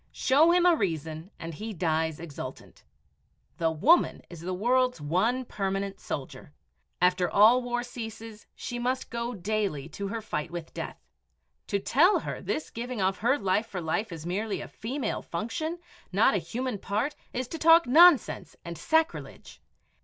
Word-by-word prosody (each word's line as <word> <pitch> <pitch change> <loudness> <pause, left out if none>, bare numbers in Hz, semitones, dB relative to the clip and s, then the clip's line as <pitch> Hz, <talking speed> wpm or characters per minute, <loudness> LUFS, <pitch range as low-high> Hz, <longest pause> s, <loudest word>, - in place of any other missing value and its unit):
Show 290 +5 +4
him 355 0 +4
a 350 -1 +6
reason, 160 - -3
and 165 -1 -7
he 215 +7 -6
dies 160 -3 0
exultant. 145 -5 -9 0.8
The 165 - +2
woman 260 - +3
is 170 -2 -9
the 180 +2 -4
world's 250 +4 +1
one 200 - 0
permanent 195 -2 -3
soldier. 130 - -7 0.5
After 180 0 +3
all 220 +7 +6
war 245 0 -2
ceases 225 -2 -8
she 245 - -5
must 255 +2 -2
go 235 0 -3
daily 195 -7 -2
to 200 +5 -5
her 225 +3 -3
fight 175 -7 -4
with 170 -1 -7
death. - - -6 0.7
To 200 - 0
tell 315 - +4
her - - -5
this 310 - -3
giving 240 0 -5
of 190 0 +1
her 245 +6 +2
life 200 +1 0
for 195 - -5
life 180 +6 -2
is 165 -1 -7
merely 200 +4 -2
a - - -7
"female 260 +5 -4
function," 235 - -4 0.3
not 200 +4 +4
a 200 - +2
human 235 +6 -4
part, 220 +11 -2 0.2
is 255 0 -3
to 325 - -6
talk 330 +1 +7
nonsense 305 - +5
and 170 -2 -7
sacrilege. 320 - -1
215 Hz, 160 wpm, -28 LUFS, 175-250 Hz, 0.8 s, talk